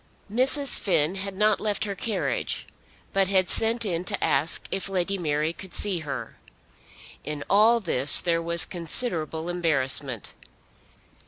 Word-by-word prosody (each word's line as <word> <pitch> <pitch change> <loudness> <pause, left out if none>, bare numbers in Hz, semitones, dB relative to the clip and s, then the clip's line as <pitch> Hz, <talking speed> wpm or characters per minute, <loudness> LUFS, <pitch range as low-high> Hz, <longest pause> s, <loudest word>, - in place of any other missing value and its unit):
Mrs. 265 +3 +4
Finn 165 -4 0
had 195 0 -6
not 210 0 +1
left 210 -2 -2
her 200 - -5
carriage, 210 +2 -4 0.5
but 195 -1 +1
had 190 -2 +1
sent 225 +1 +2
in 175 -3 -3
to - - -1
ask 160 +3 -1
if 195 0 -3
Lady 190 0 -1
Mary 155 -2 -3
could 185 0 -7
see 195 -4 +3
her. 150 -3 -8 0.9
In 150 -2 -6
all 220 +4 +3
this 150 - +5
there 165 -1 -1
was 170 0 +4
considerable 165 -2 0
embarrassment. 140 - -2
180 Hz, 140 wpm, -24 LUFS, 160-205 Hz, 0.9 s, this